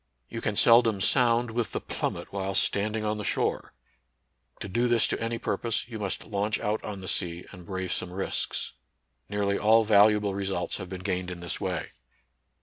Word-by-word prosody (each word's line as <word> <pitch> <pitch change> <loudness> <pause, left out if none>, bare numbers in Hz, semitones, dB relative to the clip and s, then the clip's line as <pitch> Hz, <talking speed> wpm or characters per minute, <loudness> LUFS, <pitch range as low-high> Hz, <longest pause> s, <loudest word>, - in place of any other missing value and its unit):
You 115 - -5
can 110 - -1
seldom 115 -2 +5
sound 120 +2 +3
with 115 0 -2
the - - -1
plum - - -3
met - - -9
while 95 -1 -2
standing 105 +3 +1
on 105 0 -1
the - - -4
shore. - - -1 0.9
To - - -5
do 120 +6 +1
this 120 -2 +4
to - - -1
any 115 0 -1
purpose, 115 0 -2
you 115 -2 -7
must 100 -2 -3
launch 105 +1 -1
out 105 +1 -1
on 100 -2 -6
the 95 - -8
sea, 85 0 -1
and 90 -2 -12
brave 95 -1 -3
some 90 - -4
risks. 95 +2 -2 0.6
Nearly 100 -1 0
all 110 +2 +5
valuable 105 -1 +4
re 100 0 -2
sults 95 - -2
have 95 -3 -7
been 95 -1 -6
gained 90 -1 -2
in 90 -1 -6
this 85 -2 -4
way. - - -2
105 Hz, 195 wpm, -27 LUFS, 95-110 Hz, 0.9 s, seldom